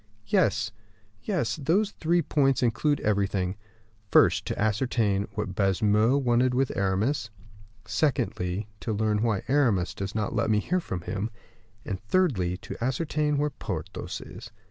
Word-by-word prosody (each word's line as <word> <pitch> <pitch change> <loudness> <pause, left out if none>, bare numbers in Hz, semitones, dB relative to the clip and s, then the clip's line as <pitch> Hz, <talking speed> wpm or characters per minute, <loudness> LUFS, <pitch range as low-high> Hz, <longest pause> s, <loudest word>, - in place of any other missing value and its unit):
"Yes, 105 +1 +2 0.5
yes, 115 +1 -1
those 185 +9 +1
three 170 -1 +1
points 135 -3 +2
include 145 +5 +1
everything: 100 -3 0 0.5
First, - - +4
to - - -3
ascertain 110 -2 +1
what 105 -3 -3
Baisemeaux 105 +6 +3
wanted 125 -1 +2
with 135 0 +1
Aramis; 105 +6 0 0.6
secondly, 105 - -1
to 110 - -3
learn 105 0 +1
why 110 -4 0
Aramis 120 -10 +2
does 95 +1 -5
not 110 -1 -1
let 115 -1 0
me 110 - +3
hear 180 +12 0
from 95 - -5
him; 100 +5 -3 0.6
and 95 -1 -4
thirdly, 105 - +1
to 115 - -7
ascertain 150 +3 0
where 150 +1 0
Porthos - - -5
is. - - -10
110 Hz, 140 wpm, -27 LUFS, 100-135 Hz, 0.6 s, First